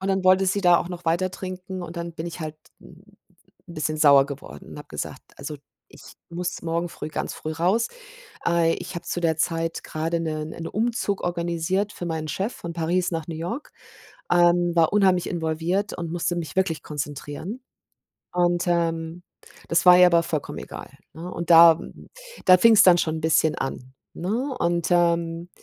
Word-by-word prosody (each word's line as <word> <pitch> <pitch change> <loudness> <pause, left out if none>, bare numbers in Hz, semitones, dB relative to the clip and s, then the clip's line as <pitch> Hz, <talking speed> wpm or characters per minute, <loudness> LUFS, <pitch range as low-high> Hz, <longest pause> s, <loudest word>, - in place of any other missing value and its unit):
und 190 - -3
dann 190 -1 +1
wollte 185 +1 +5
sie 200 +2 +1
da 175 -2 +5
auch 175 - -4
noch 175 -1 -8
weiter 175 +3 +1
trinken 185 0 -7
und 170 0 -8
dann 170 0 -5
bin 160 +1 -6
ich 170 0 -7
halt 155 -1 -5 0.2
'n 175 +2 -16 0.6
bisschen 155 -2 -3
sauer 140 -3 +6
geworden 130 - -10
und - - -9
habe - - -11
gesagt: - - -6 0.2
„Also 145 +2 -6 0.3
ich - - -16 0.3
muss 175 +1 -4
morgen 170 +1 -2
früh 155 - -7
ganz 155 - -4
früh 155 - -6
raus. 185 +9 +1 0.6
Äh, 170 -1 +3
ich - - -8
habe 170 0 -6
zu 175 - -3
der 160 -2 +1
Zeit 165 +1 -1
grade 165 +2 -2
'ne 155 -2 -3
'nen 165 +1 -7
Umzug 220 -3 -1
organisiert 175 +3 -1
für 175 - -6
meinen 160 -2 -3
Chef 200 +9 -2
von 170 - -7
Paris 170 +2 0
nach 165 -2 -4
New 165 - -6
York, 180 - -5 0.6
ähm, 175 0 +4
war 165 +1 +3
unheimlich 190 -4 +3
involviert 170 +5 -2
und 170 -2 -5
musste 175 0 -1
mich 170 +1 -5
wirklich 180 -4 0
konzentrieren 150 - -6 0.7
und, 175 0 +1
ähm, 165 0 -1 0.5
das 170 - +1
war 180 0 +9
ihr 180 - +9
aber 170 -1 +3
vollkommen 155 -3 -4
egal, - - -9 0.2
ne, 170 +3 -8
und 170 - -5
da, 165 0 +9
m - - -11 0.4
da 185 0 +8
fing's 220 +1 +6
dann 180 -2 +7
schon 160 -2 0
'n 160 - -7
bisschen 160 0 +2
an, 130 -1 -5 0.2
ne 245 +9 -2
und, 170 -1 0
ähm, 170 0 +1
170 Hz, 185 wpm, -24 LUFS, 160-180 Hz, 0.7 s, war